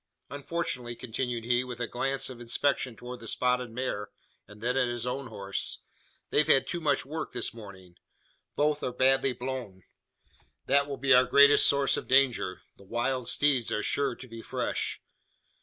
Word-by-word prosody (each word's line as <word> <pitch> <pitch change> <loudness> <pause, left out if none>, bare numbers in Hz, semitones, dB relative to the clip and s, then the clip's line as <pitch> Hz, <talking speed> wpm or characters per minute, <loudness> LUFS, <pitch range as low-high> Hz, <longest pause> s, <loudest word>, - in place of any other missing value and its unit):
Unfortunately," 140 -5 -3
continued 120 0 -3
he, 120 +1 +1
with 125 -1 -7
a 120 - -1
glance 135 +4 -1
of 120 -1 -10
inspection 125 +1 0
towards 125 +2 -8
the 115 - -10
spotted 125 +1 0
mare, 115 -3 -3 0.4
and 105 0 -14
then 120 +3 -1
at 130 -2 +2
his 120 -1 -2
own 130 +1 -3
horse, 100 -3 -3 0.5
"they've 150 - +3
had 135 - +4
too 175 - -1
much 145 -3 +1
work 155 +3 -5
this - - -2
morning. 95 -5 -12 0.6
Both 150 0 +1
are 125 - -2
badly 130 +1 +3
blown. 125 -8 -6 0.8
That 140 +1 +3
will 140 -1 -5
be 135 0 +3
our 125 0 +6
greatest 140 +2 +6
source 140 -1 +2
of - - -5
danger. 130 -8 +2
The - - -16
wild 120 +4 -2
steeds 140 -5 +2
are 105 - -1
sure 140 -3 0
to 130 - -11
be 115 -1 -9
fresh." - - -2
125 Hz, 175 wpm, -29 LUFS, 115-135 Hz, 0.8 s, our